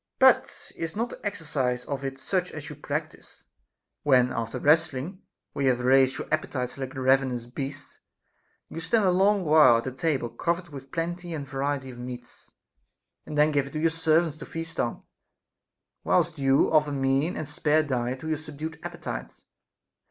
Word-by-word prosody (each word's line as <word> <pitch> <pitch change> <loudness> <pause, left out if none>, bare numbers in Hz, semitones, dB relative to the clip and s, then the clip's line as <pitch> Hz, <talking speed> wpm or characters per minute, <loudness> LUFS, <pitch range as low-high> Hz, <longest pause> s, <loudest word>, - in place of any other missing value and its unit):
But 260 -2 +3
is 165 +2 -4
not 230 +3 -1
the - - -11
exercise 145 -11 -2
of 140 -1 -4
it 135 0 -4
such 180 +6 -1
as 150 -1 -7
you - - -8
practise, 150 +2 -6 0.6
when 125 -3 +4
after 115 0 -3
wrestling, 160 +4 +1 0.3
where 140 - -1
you - - +5
have 125 -1 +1
raised 130 +1 +4
your - - -5
appetites 130 -5 -1
like 130 +1 -5
ravenous 130 -2 +2
beasts, 135 +3 -7 0.7
you - - -7
stand 215 +6 +2
a 185 - +4
long 195 +1 +3
while 150 -6 +7
at 115 - -3
a 130 - -2
table 135 -2 -1
covered 170 +8 -2
with 135 -2 -10
plenty 175 +1 -3
and 140 -3 -5
variety 135 -1 -2
of 120 - -11
meats, 125 -1 -9 0.8
and 150 - -5
then 150 +1 +5
give 140 -2 +1
it 140 - -12
to 155 - -2
your 165 +1 +2
servants 160 -1 +2
to - - -8
feast 165 0 -6
on, 120 - -1 1.0
whilst 155 - +1
you 135 0 +3
offer 150 -2 +3
mean 135 +4 +1
and 155 - -4
spare 150 +1 +2
diet 130 -2 -2
to 160 - -6
your 155 -1 0
subdued 155 +1 -6
appetites - - -7
145 Hz, 175 wpm, -27 LUFS, 130-160 Hz, 1.0 s, while